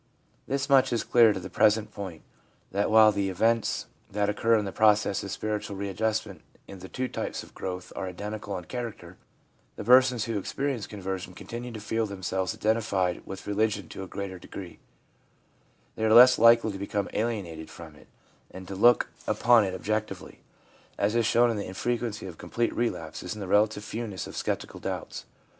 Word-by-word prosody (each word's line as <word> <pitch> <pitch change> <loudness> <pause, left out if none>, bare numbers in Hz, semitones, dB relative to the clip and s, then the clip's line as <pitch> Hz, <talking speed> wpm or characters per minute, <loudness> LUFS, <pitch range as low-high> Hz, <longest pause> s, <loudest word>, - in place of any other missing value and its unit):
This 140 +1 -1
much 135 -2 +4
is 120 - 0
clear 115 -2 +5
to 100 - -3
the 95 - -7
present 105 +2 +2
point, 95 -7 -7 0.5
that 100 +2 0
while 110 -1 +7
the 100 -2 -1
events 110 +4 +1 0.2
that 100 0 0
occur 115 +2 +2
in 105 - -1
the 95 - -4
process 105 0 +3
of 100 - -6
spiritual 105 0 -3
readjust 105 +3 -1
ment - - -11 0.3
in 95 - -10
the 95 +1 -10
two 130 0 -2
types - - -4
of - - -16
growth 90 -1 -6
are 95 - -4
identical 100 +2 -5
in 90 - -7
character, 105 -5 -7 0.6
the - - -6
persons 125 0 +5
who 115 -3 -2
experience 135 +2 -3
conversion 95 -3 -5
continue 120 +4 -7
to 110 - -6
feel 110 +1 -1
themselves 95 -2 -3
identified 105 -5 0
with 95 - -7
religion 105 -2 0
to - - -8
a 95 - -6
greater 95 -1 -6
degree; 90 0 -9 1.2
they 110 - -4
are 110 - +3
less 125 +2 +9
likely 115 -1 +6
to 95 - -7
become 100 0 -2
alienated 100 -8 -3
from - - -11
it, - - -18 0.4
and 95 0 -10
to 100 - -6
look 120 +5 +5 0.2
upon 120 -2 +5
it 95 -2 -2
objectively, 110 +3 -4 0.6
as 100 +2 +1
is 115 -2 +2
shown 120 +2 +4
in 110 - -3
the 100 - -4
infrequency 115 +3 -3
of 90 -4 -9
complete 115 +7 -1
relapses 90 -5 -3
and 105 - -8
the - - -6
relative 105 +2 +2
fewness 105 -3 -5
of - - -9
sceptical - - -3
doubts. - - -5
105 Hz, 185 wpm, -27 LUFS, 95-115 Hz, 1.2 s, less